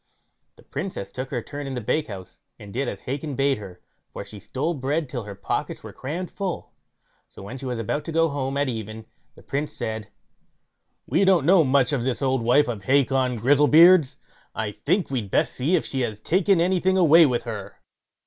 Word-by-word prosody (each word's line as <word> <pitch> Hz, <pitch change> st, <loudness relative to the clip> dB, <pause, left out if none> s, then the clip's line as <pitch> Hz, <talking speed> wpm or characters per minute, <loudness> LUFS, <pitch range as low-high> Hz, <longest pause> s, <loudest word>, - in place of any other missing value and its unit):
The -, -, -19 dB
Princess 180 Hz, -, -5 dB
took 130 Hz, +1 st, -5 dB
her 120 Hz, -4 st, -3 dB
turn 145 Hz, -1 st, -7 dB
in 135 Hz, -, -4 dB
the -, -, -2 dB
bakehouse, 105 Hz, -6 st, -4 dB, 0.2 s
and 100 Hz, -1 st, -11 dB
did 135 Hz, +3 st, -1 dB
as -, -, -5 dB
Hacon 140 Hz, +2 st, -4 dB
bade 135 Hz, -2 st, +1 dB
her, 90 Hz, -4 st, -11 dB, 0.3 s
for -, -, -7 dB
she 105 Hz, -, -10 dB
stole 140 Hz, -, -2 dB
bread 145 Hz, +2 st, -2 dB
till 125 Hz, -4 st, -5 dB
her 100 Hz, -1 st, -8 dB
pockets -, -, -3 dB
were -, -, -9 dB
crammed 170 Hz, +7 st, -5 dB
full. 190 Hz, -4 st, -5 dB, 0.6 s
So -, -, -12 dB
when 125 Hz, +7 st, -8 dB
she 135 Hz, -, -6 dB
was 125 Hz, -2 st, -3 dB
about 115 Hz, +7 st, -2 dB
to -, -, -4 dB
go 165 Hz, +1 st, +3 dB
home 140 Hz, -2 st, -3 dB
at 145 Hz, 0 st, +1 dB
even, 110 Hz, -2 st, -5 dB, 0.3 s
the -, -, -17 dB
Prince 145 Hz, +2 st, -3 dB
said: 110 Hz, -1 st, -5 dB, 1.0 s
"We 165 Hz, +9 st, +2 dB
don't 185 Hz, -6 st, +4 dB
know 175 Hz, 0 st, +6 dB
much 135 Hz, 0 st, +2 dB
of 130 Hz, -4 st, 0 dB
this 130 Hz, +2 st, -2 dB
old 130 Hz, -2 st, +1 dB
wife 125 Hz, +6 st, +4 dB
of 110 Hz, -5 st, -5 dB
Hacon 130 Hz, -2 st, +2 dB
Grizzlebeard's, 150 Hz, -, +5 dB, 0.4 s
I 110 Hz, -1 st, -2 dB
think 170 Hz, -, -1 dB
we'd 115 Hz, -7 st, -2 dB
best -, -, +1 dB
see 145 Hz, +9 st, +1 dB
if 170 Hz, -, 0 dB
she 135 Hz, -, -3 dB
has 110 Hz, -4 st, -3 dB
taken 185 Hz, -, +2 dB
anything 185 Hz, +2 st, +2 dB
away 165 Hz, -2 st, +7 dB
with 120 Hz, -2 st, -1 dB
her." 110 Hz, -4 st, -7 dB
135 Hz, 200 wpm, -24 LUFS, 115-155 Hz, 1.0 s, away